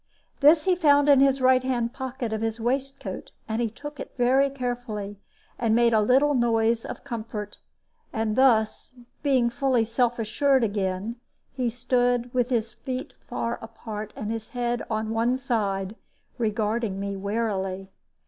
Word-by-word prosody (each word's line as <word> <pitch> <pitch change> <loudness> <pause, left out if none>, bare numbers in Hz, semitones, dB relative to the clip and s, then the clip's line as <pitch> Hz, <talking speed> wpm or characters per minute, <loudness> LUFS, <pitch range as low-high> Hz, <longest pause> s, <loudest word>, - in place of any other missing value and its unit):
This 300 +2 +6
he 370 -1 +3
found 290 -4 +4
in 285 -2 +7
the 275 0 +4
right 255 0 +5
hand 245 -2 -1
pocket 260 -3 -4
of 220 - -2
his 225 0 -2
waistcoat, 260 -3 -3 0.2
and 220 +1 -2 0.2
took 295 +2 -8
it - - -7
very 260 +3 +4
carefully, 240 -6 -4 0.4
and 225 -2 +2
made 235 0 +4
a 215 - +4
little 265 +7 +4
noise 230 -2 +2
of - - -7
comfort; 220 -5 -6 0.5
and 220 -1 -1
thus, 245 -2 +2 0.3
being 260 -5 +2
fully 260 -2 +2
self 240 +2 0
assured 260 +4 +2
again, 200 +1 -2 0.4
he 250 -2 -1
stood, 245 0 0
with 250 -1 +1
his 230 -3 -1
feet 260 0 -5 0.2
far 235 +1 -2
apart 220 -1 -7
and 210 +1 -4
his 225 -1 -4
head 240 -1 -2
on 220 0 -2
one 230 +3 +1
side, 210 -6 -1 0.4
regarding 215 -2 -1
me 200 0 -3
warily. 195 -2 -2
235 Hz, 150 wpm, -26 LUFS, 220-260 Hz, 0.5 s, in